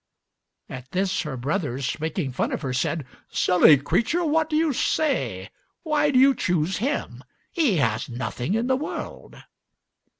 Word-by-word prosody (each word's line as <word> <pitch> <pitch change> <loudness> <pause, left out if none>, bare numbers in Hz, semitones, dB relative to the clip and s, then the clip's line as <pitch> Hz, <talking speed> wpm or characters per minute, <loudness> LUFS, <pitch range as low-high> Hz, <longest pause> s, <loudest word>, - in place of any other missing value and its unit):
At 130 -1 -9
this 190 0 0
her 150 -5 -5
brothers, 135 -2 -2
making 160 -2 -2
fun 125 - -2
of - - -4
her, 130 -2 -2
said, 135 +3 -1 0.2
"Silly 175 -5 +5
creature, 235 - 0
what 315 0 +1
do 305 - -1
you 315 -2 +2
say? 305 +4 -1 0.3
Why 300 -2 +1
do 270 - +2
you 270 +2 +6
choose 180 -4 0
him? 275 +7 -3 0.3
He 295 - +2
has 115 -6 0
nothing 125 - -3
in 230 +2 0
the 260 +1 +2
world." 285 +4 -6
185 Hz, 155 wpm, -24 LUFS, -, 0.3 s, you